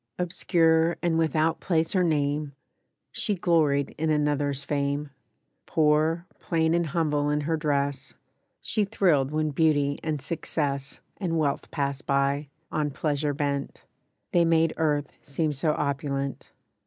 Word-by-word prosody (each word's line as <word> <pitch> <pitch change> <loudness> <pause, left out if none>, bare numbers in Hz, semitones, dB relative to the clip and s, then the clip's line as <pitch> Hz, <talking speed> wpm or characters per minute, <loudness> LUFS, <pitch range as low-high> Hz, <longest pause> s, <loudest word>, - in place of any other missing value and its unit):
Obscure 170 -2 +2
and 165 -1 +2
without 160 0 +1
place 165 -1 0
or 185 - +4
name, 145 -2 0 0.6
She 210 - 0
gloried 155 -6 +2
in 160 0 0
another's 145 -2 0
fame. 140 0 -1 0.6
Poor, 160 +1 +2
plain 160 -1 +1
and 170 -1 +1
humble 150 -2 0
in 150 0 +1
her 160 +3 0
dress, 140 -3 -1 0.5
She 215 - +1
thrilled 165 -9 +2
when 155 0 0
beauty 145 -2 +2
and 155 -2 -1
success 145 -2 -3 0.2
And 170 -4 -1
wealth 145 -3 -1
passed 140 -2 -3
by, 140 +1 +1 0.2
on 150 -1 0
pleasure 145 0 -1
bent; 140 -1 -3 0.5
They 175 - +4
made 165 -1 +3
earth 150 -3 0
seem 150 +2 -1
so 150 +2 0
opulent. 140 -1 -2
150 Hz, 130 wpm, -26 LUFS, 140-165 Hz, 0.6 s, or